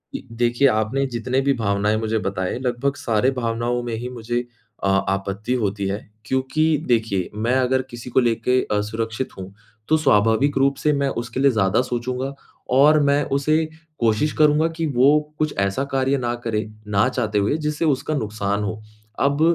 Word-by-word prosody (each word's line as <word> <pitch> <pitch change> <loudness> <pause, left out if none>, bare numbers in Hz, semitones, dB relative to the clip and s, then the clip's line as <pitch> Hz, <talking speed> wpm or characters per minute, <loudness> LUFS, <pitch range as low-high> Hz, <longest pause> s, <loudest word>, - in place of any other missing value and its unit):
जी, - - -7
देखिए, 120 +3 +2
आपने 110 +3 +1
जितने 125 +1 -1
भी 140 0 +2
भावनाएँ 105 -2 0
मुझे 110 0 -1
बताएँ, 95 +3 -2
लगभग 130 +2 -1
सारे 120 0 +1
भावनाओं 120 0 -1
में 120 -1 -4
ही 120 +3 -5
मुझे 120 0 -3 0.4
अ 100 - +2 0.2
आपत्ति 100 +5 -2
होती 100 -4 -1
है, 100 +1 -2 0.3
क्योंकि 130 +5 0 0.2
देखिए 110 -6 +1
मैं 115 +4 0
अगर 130 0 +2
किसी 120 0 -8
को 125 - +3
लेके 120 +1 +2 0.2
असुरक्षित 110 +4 -3
हूँ, 95 +1 -8 0.3
तो 155 - +4
स्वाभाविक 115 +1 +3
रूप 135 +1 +3
से 150 -1 +1
मैं 140 -1 0
उसके 120 +2 -6
लिए 140 0 +5
ज़्यादा 105 0 +2
सोचूँगा 125 +2 -3 0.4
और 150 +3 +6
मैं 140 +1 +3
उसे 155 +3 +2 0.3
कोशिश 115 +6 +2
करूँगा 150 +1 +4
कि 165 - 0
वो 140 +5 +5 0.2
कुछ 155 -1 0
ऐसा 100 +7 0
कार्य 135 +1 +2
ना 120 -2 -1
करे 110 -2 -1 0.2
ना 105 +2 +2
चाहते 110 -5 -1
हुए 105 +9 +1
जिससे 150 +1 -2
उसका 150 0 0
नुक़्सान 105 -3 -2
हो। 110 +1 -4 0.4
अब 140 +2 +1
120 Hz, 170 wpm, -22 LUFS, 110-135 Hz, 0.4 s, और